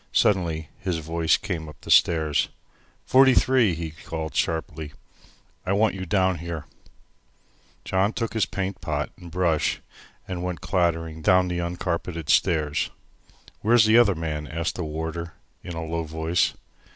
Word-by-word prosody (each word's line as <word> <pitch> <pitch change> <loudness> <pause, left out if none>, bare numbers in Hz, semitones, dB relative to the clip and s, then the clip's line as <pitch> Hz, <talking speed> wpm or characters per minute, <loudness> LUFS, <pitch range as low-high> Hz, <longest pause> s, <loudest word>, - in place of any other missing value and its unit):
Suddenly 85 -6 +2
his 90 -3 -2
voice 80 0 +1
came 85 -8 -4
up 75 - -13
the - - -5
stairs. 80 -3 +4 0.6
"Forty 130 0 +6
three," 120 -9 +4
he 80 -1 -5
called 80 0 -6
sharply, 80 -2 -2 0.7
"I 95 - 0
want 105 +2 +3
you 95 -1 -6
down 95 -1 +2
here." 85 -2 -5 1.2
John 95 +3 +1
took 115 -1 -3
his 110 -3 +1
paint 95 0 -4
pot - - -2
and 90 - -12
brush 85 -3 +1 0.5
and 90 -2 -4
went 90 -2 -3
clattering 80 -3 -1
down 90 +3 +4
the 90 0 -2
uncarpeted 85 -2 -2
stairs. 75 -5 +2 0.7
"Where's 115 0 +5
the 110 +2 +6
other 100 -5 +4
man?" 75 -2 -4
asked 80 +4 -2
the 90 - -4
warder, 80 +2 -4 0.3
in 85 - -7
a 80 0 -4
low 85 +1 -2
voice. 80 +1 0
85 Hz, 150 wpm, -25 LUFS, 80-95 Hz, 1.2 s, Forty